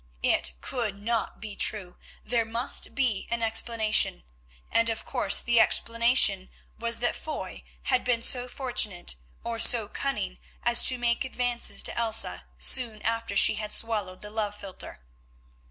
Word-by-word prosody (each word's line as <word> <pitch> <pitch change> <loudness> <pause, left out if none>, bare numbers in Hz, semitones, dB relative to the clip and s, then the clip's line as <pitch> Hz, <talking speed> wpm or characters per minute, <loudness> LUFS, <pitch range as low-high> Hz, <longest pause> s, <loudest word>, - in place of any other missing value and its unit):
It 65 - +2
could 220 -6 -3
not 225 +1 -3
be 215 -2 -8
true, 190 -5 -1 0.3
there 235 0 0
must 230 +3 -1
be 245 -8 -1
an 235 0 -3
explanation, 220 - +1 0.5
and, 230 0 +2
of 225 -1 -5
course, 255 - +2
the 235 -1 +2
explanation 230 -4 +3 0.3
was 230 0 +3
that 245 - 0
Foy 310 - -7 0.2
had 255 -1 0
been 240 -2 -1
so 250 -1 +4
fortunate, 240 -8 -1 0.3
or 230 -1 -5
so 225 -2 +4
cunning 210 -7 -4 0.2
as 240 0 +4
to 255 - +4
make 240 0 0
advances 245 -2 -1
to - - 0
Elsa 225 -1 +1
soon 230 -5 +2
after 230 -2 -3
she - - +6
had 210 0 -5
swallowed 210 -5 0
the 210 - -7
love 210 -2 -3
philtre. 190 - -9
230 Hz, 150 wpm, -26 LUFS, 210-240 Hz, 0.5 s, she